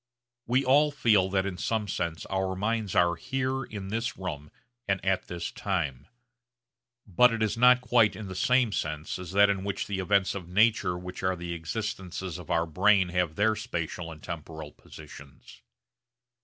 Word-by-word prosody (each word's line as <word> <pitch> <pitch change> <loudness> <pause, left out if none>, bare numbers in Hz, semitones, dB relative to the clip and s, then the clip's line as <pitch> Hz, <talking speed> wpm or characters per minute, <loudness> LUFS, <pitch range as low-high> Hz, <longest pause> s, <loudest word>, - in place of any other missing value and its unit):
We 130 +3 +2
all 145 +4 +5
feel 110 -9 +3
that 95 0 0
in 95 -2 -4
some 110 0 -1
sense 85 -4 -3
our 95 -1 -2
minds 105 0 -2
are 85 0 +4
here 135 +7 -2
in 100 -4 -7
this 115 +3 -2
room 75 -6 -6 0.4
and 100 -1 +1
at 95 -1 0
this 85 -1 -5
time. 75 -8 -3 1.0
But 120 +5 +4
it 115 -1 -1
is 110 - 0
not 125 +1 +6
quite 120 -4 +3
in 105 +1 -7
the 95 - -6
same 125 +4 +2
sense 75 -2 -3
as 90 -3 -7
that 100 0 +6
in 95 -1 -3
which 100 0 -3
the 100 -2 -3
events 100 +1 +2
of 90 -3 -7
nature 100 -2 +2
which 90 +1 -8
are 95 0 0
the 85 -1 -5
existences 90 0 -5
of 90 - -11
our 85 0 +2
brains 95 +2 +3
have 90 -3 0
their 110 +2 +2
spatial 85 -6 -4
and 80 -1 -12
temporal 80 -2 -7
positions. 70 -3 -14
95 Hz, 175 wpm, -28 LUFS, 85-110 Hz, 1.0 s, not